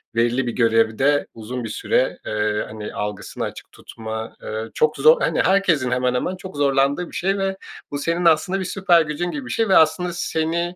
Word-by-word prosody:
belirli 120 +2 +1
bir - - -1
görevde 115 +5 +2
uzun 120 +3 -6
bir 115 - -5
süre, 125 +4 0
eee, 105 0 -1
hani, 105 -1 -7
algısını 105 -1 -5
açık - - -7
tutma, 110 0 -7
eee, 110 +1 -4
çok 155 0 +1
zor 485 +1 +5
Hani, - - +1
herkesin 175 -10 +2
hemen 125 0 +1
hemen 180 +9 -1
çok 185 -3 -10
zorlandığı 140 +4 +1
bir - - -12
şey 195 +2 0
ve 195 0 -2 0.3
bu 145 - -2
senin 170 +4 -1
aslında 170 +4 +3
bir 190 - -3
süper 180 -2 +3
gücün 160 +3 -3
gibi 275 -3 -5
bir - - -6
şey 225 -2 0
ve 190 - +6
aslında 170 +3 +3
seni 170 +1 -2
145 Hz, 195 wpm, -21 LUFS, 115-180 Hz, 0.3 s, ve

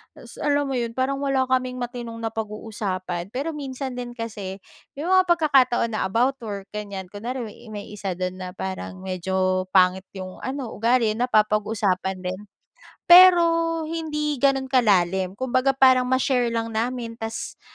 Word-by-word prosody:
Tapos - - -13
alam 290 -1 +2
mo 275 - -3
'yon, 230 -1 -3
parang 270 +1 0
wala 275 -2 +1
kaming 255 -1 0
matinong 240 -2 -5
napag-uusapan. 205 -5 -4
Pero 275 +8 -3
minsan 270 -2 -5
din 245 -1 -6
kasi 205 -4 -5 0.4
'yong 325 +6 -2
mga 370 0 +5
pagkakataon 270 -8 +3
na 215 - 0
about 250 +7 +1
work, 200 -3 -6
ganyan. 200 -2 -5
Kunwari 240 +4 -4
may 210 - -11
may 205 -1 -7
isa 195 -3 -4
do'n 185 0 -3
na 185 - -5
parang 190 0 -5
medyo 185 0 -1
pangit 185 0 +4
'yong 185 -1 -8
ano, 260 -3 -4
ugali, 230 0 +2
napapag-uusapan 215 -4 +1
din. 185 +2 -3 0.7
Pero, 360 -1 +9 0.4
hindi 300 -3 -3
gano'n 275 -1 +3
kalalim. 190 -6 +2
Kumbaga, 260 +2 +1
parang 260 -2 +5
ma-share 255 -1 +2
lang 230 -1 -2
namin 235 +1 -2
ta's 225 0 -5
230 Hz, 150 wpm, -24 LUFS, 195-260 Hz, 0.7 s, Pero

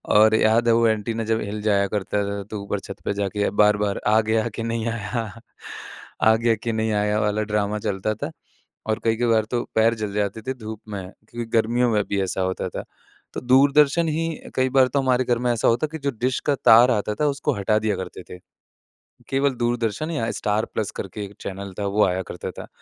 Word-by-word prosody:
और 110 +1 +6
याद 110 +2 +3
है 115 - +5
वो 115 0 +4
एंटीना 110 +1 -1
जब 110 0 +1
हिल 105 +1 -4
जाया 100 -2 +3
करता 105 0 -1
था 100 0 -4
तो 105 - -4
ऊपर 100 0 -3
छत - - -9
पे - - 0
जाके 100 +1 -1
बार-बार 105 -1 +2
आ 110 +1 +5
गया 110 +1 0
के 115 - -4
नहीं 115 0 -2
आया। 115 +1 -3 1.0
आ 110 0 +6
गया 115 0 +2
के 115 - -1
नहीं 110 0 0
आया 105 +1 +1
वाला 105 0 0
ड्रामा 105 0 0
चलता 100 +2 -2
था - - -5 0.6
और 110 - +1
कई-कभार 115 -1 +2
तो 120 - 0
पैर 115 +1 +4
जल 100 -2 -3
जाते 105 +1 -2
थे 130 - 0
धूप 110 -3 -8
में 100 -2 -4 0.3
क्योंकि 120 0 -5
गर्मियों 120 +2 +2
में 105 -1 +2
भी 100 -1 0
ऐसा 95 0 -2
होता 95 0 -2
था। - - -6 0.5
तो - - -4
दूरदर्शन 140 +5 +4
ही 165 +2 -1 0.3
कई 130 0 +2
बार 130 -1 +4
तो 140 +2 0
हमारे 130 -1 +2
घर 120 -1 +1
में 125 0 +1
ऐसा 115 - 0
होता 125 +7 +1
कि 160 +1 -7
जो 140 0 -1
डिश 130 +1 0
का 145 - +3
तार 120 +3 +8
आता 105 -1 -1
था 150 - +3
उसको 140 0 -1
हटा 105 +2 +1
दिया 105 -2 0
करते 95 -1 -7
थे, 90 - -8 0.9
केवल 135 0 +1
दूरदर्शन 120 +4 -1
या 115 -8 -1
स्टार 105 +1 -1
प्लस 110 -3 -2
करके 100 +2 -6
एक 100 +1 -12
चैनल 100 0 -6
था 100 - -2
वो 105 +2 +2
आया 95 0 0
करता - - -6
था। - - -10
110 Hz, 215 wpm, -23 LUFS, 105-120 Hz, 1.0 s, तार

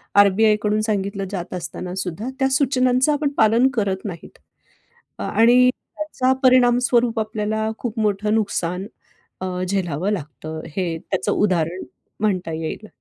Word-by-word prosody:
R. 200 0 +7
बी. 205 +4 +2
आयकडून 210 0 +2
सांगितलं 200 -2 -2
जात 180 -3 -5
असतानासुद्धा, 180 +4 -5
त्या 265 0 +2
सूचनांचं 260 0 +2
आपण 290 0 0
पालन 225 +4 +5
करत 200 -4 -1
नाहीत 170 -5 -8 0.8
आणि 240 +4 +4 0.3
त्याचा, 270 -4 0
परिणामस्वरूप 245 -2 +4
आपल्याला 220 0 -2
खूप 235 -2 -4
मोठं 210 0 +1
नुकसान 190 -4 -1 0.5
अ, 185 - -3 0.2
झेलावं 185 -2 -1
लागतं, 155 -2 -6 0.2
हे 175 -4 -1
त्याचं 190 +4 -2
उदाहरण 180 -3 0 0.4
म्हणता 185 -6 0
येईल. 160 +6 -5
210 Hz, 125 wpm, -21 LUFS, 185-240 Hz, 0.8 s, R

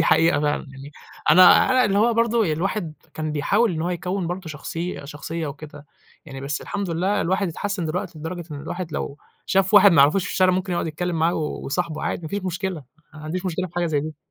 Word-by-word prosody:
دي 165 - +3
حقيقة 165 -3 +4
فعلًا، 150 0 -1
يعني 135 +2 -11 0.4
أنا 180 +3 +7
أنا 255 -1 +4
اللي 200 -1 +2
هو 230 +2 +3
برضه 230 -6 +2
الواحد 170 0 -2 0.2
كان 155 -1 -3
بيحاول 200 +8 +2
إن 160 - -3
هو 175 - -1
يكوّن 180 +1 -2
برضه 175 0 -5
شخصي 165 0 -5
شخصيّة 155 +2 -5
وكده 145 0 -9 0.4
يعني، 135 -3 -9
بس 145 +2 -3
الحمد 200 -4 -4
لله 190 +5 0
الواحد 190 +2 0
اتحسن 195 +2 -3
دلوقتي، 170 0 -4
لدرجة 170 +3 -5
إن 145 -1 -6
الواحد 170 +1 -5
لو 145 +1 -4 0.3
شاف 195 +2 +2
واحد 200 -2 +8
ما 165 - +3
يعرفوش 170 +6 +3
في - - -4
الشارع 185 -1 +4
ممكن 185 0 -1
يقعد 170 - -1
يتكلّم 170 +2 -3
معاه 165 +2 +2
ويصاحبه 155 +1 -3
عادي، - - -2
ما 160 - -5
فيش 200 +2 -3
مشكلة، 180 -4 -3 0.3
ما 155 - -10
عنديش 175 +5 -4
مشكلة 185 +1 -2
في 175 - -18
حاجة 175 -1 0
زي 150 -3 0
دي. 155 0 -6
170 Hz, 220 wpm, -23 LUFS, 155-190 Hz, 0.4 s, واحد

